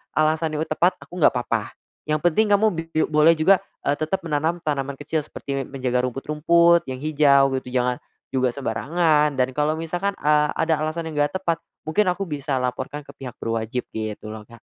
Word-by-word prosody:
alasannya 155 0 +1
tepat 180 +2 +2
aku 180 - -9
nggak 155 - +5
apa-apa, 115 -3 -2 0.3
yang 155 0 +1
penting 190 +6 +3
kamu 205 +2 +5
bip 165 -1 -5
biu 155 - +3
boleh 155 +2 +6
juga, 180 +5 +4 0.2
eee, 140 - +1
tetap 160 +4 -2
menanam 160 +2 -1
tanaman 140 -2 -2
kecil 155 +2 -1
seperti 135 -3 -5
menjaga 125 -2 -1
rumput-rumput 165 +5 +3
yang 130 0 -5
hijau 140 -3 +4
gitu, - - -18
jangan 125 0 0 0.3
juga 130 -1 +1
sembarangan 150 +3 +1
dan 130 0 +1
kalau 150 +3 0
misalkan, 175 +5 -2
eee, 150 0 +3
ada 160 -1 +1
alasan 160 +1 -3
yang 150 - -3
gak 145 - -6
tepat, 170 -3 0 0.3
mungkin 185 +5 +2
aku 195 +2 -3
bisa 145 -2 -2
laporkan 130 +3 -3
ke 140 - -12
pihak 125 -3 -8
berwajib 115 +2 -2
gitu 110 -1 -5
loh, 110 -1 -9
Kak. 115 -1 -15
150 Hz, 185 wpm, -23 LUFS, 130-165 Hz, 0.3 s, boleh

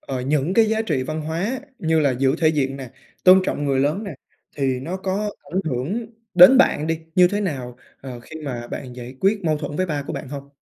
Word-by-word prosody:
ờ, 130 -2 -5
những 150 +6 0
cái 225 - +6
giá 220 0 0
trị 150 -11 -1
văn 155 +4 -4
hóa 180 - -3 0.2
như 160 -1 +1
là 140 -3 +3
giữ 130 +2 +1
thể 160 -2 +4
diện 135 -3 0
nè, 130 -3 -8 0.3
tôn 185 +1 +8
trọng 145 - -2
người 135 -2 +1
lớn 150 +10 0
nè, 195 -7 -6 0.4
thì 130 -2 0
nó 175 +7 -4
có 195 +2 -2 0.2
ảnh 190 - +1
hưởng 160 - -2 0.3
đến 185 +10 +9
bạn 155 - +3
đi 165 0 -1 0.2
như 180 -1 +6
thế 205 +3 -2
nào, 130 -10 -4 0.2
ờ, 125 -3 -8
khi 160 +6 -10
mà 120 -3 -5
bạn 125 0 -7
giải 125 +1 -9
quyết 200 -1 +1
mâu 155 -2 +1
thuẫn 150 -1 -5
với 185 +2 0
ba 150 -3 -2
của - - -4
bạn - - -6
hông? 140 0 -8
155 Hz, 235 wpm, -22 LUFS, 135-185 Hz, 0.4 s, đến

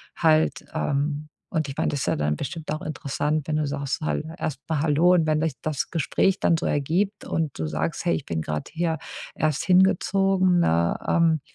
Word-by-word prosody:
halt, 160 -1 +2
ähm 145 +1 -1 0.2
und 155 -3 0
ich 135 - -6
meine, - - +1
das 145 - -2
ist - - -1
ja - - +1
dann 75 0 0
bestimmt 155 - -5
auch 155 - -3
interessant, 150 0 -2
wenn 155 - 0
du 155 0 +1
sagst 140 0 -3
halt 155 - -1
erst 140 -4 -3
mal 155 -3 +1
hallo 160 +4 +4
und 165 -3 +3
wenn 155 -1 +1
sich 160 -2 0
das 155 -3 -2
Gespräch 180 +4 +1
dann 165 - +3
so 160 - -2
ergibt 180 +9 0
und 160 -4 -2
du 80 - -2
sagst: 80 - -2
„Hey, 170 - +3
ich 145 - -5
bin 80 -1 -2
grade 75 -1 -4
hier 165 -2 -1 0.3
erst 155 -3 0
hingezogen,“ 190 0 +3
ne? 85 - +2
Ähm, 165 -3 +3
155 Hz, 205 wpm, -25 LUFS, 140-170 Hz, 0.3 s, hallo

